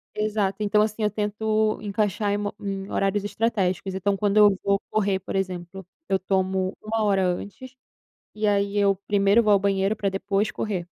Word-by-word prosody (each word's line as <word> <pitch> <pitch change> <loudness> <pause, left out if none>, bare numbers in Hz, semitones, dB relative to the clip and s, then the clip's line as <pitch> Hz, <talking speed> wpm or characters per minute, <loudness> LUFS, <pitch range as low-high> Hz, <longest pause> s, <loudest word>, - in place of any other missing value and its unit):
Exato, 210 -2 -1
então, 210 +1 +3
assim, 215 0 -1
eu 210 - +3
tento 215 +1 0
encaixar 205 0 -1
em 205 - +1
mo 205 0 -3
em 195 -1 -5
horários 195 +1 0
estratégicos. 195 -4 -1
Então 195 +1 0
quando 205 +1 +1
eu 205 -2 +6
vou 200 0 +2
correr, 200 -3 0
por 190 - -7
exemplo, 185 -1 -4 0.2
eu 195 - +3
tomo 190 0 -1
1 220 0 -1
hora 195 -2 +2
antes, 205 +8 -5 0.6
e 215 0 -1
aí 200 0 +1
eu 200 -1 +3
primeiro 205 +2 +4
vou 210 -2 +3
ao 200 - +6
banheiro 195 +1 +1
para 205 -2 -1
depois 195 +2 -1
correr. 185 -5 -3
200 Hz, 180 wpm, -24 LUFS, 195-210 Hz, 0.6 s, eu